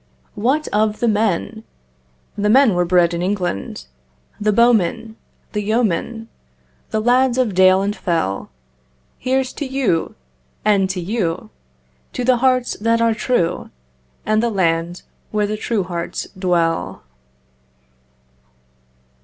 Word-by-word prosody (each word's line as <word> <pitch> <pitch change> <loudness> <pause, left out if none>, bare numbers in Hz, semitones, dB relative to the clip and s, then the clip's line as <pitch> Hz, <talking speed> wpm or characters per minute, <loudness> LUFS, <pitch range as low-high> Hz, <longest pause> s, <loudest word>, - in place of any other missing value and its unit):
What 265 +9 0
of 215 0 0
the 240 - +1
men? 220 0 0 0.7
The 210 0 0
men 255 -1 +5
were 175 0 +1
bred 175 -1 +3
in 170 - -2
England: 180 - -3 0.5
The 210 0 +2
bowmen—the 225 -1 0
yeomen, 225 +1 -1 0.6
The 220 - -1
lads 250 +2 +3
of 245 -6 +1
dale 185 +1 +5
and 205 +1 -1
fell. 165 - -2 0.7
Here's 260 0 0
to - - -5
you—and 180 - -1
to 190 -1 -2
you! 180 -2 -3 0.6
To 250 - -3
the 255 0 +4
hearts 255 0 +1
that 230 +1 +2
are 230 -1 +3
true 220 -7 -1 0.6
And 215 0 +2
the 235 - +1
land 175 -3 -1 0.3
where 210 -1 0
the 210 +1 -2
true 215 -1 -1
hearts 170 -1 -4
dwell. 175 -3 -1
210 Hz, 120 wpm, -19 LUFS, 175-235 Hz, 0.7 s, men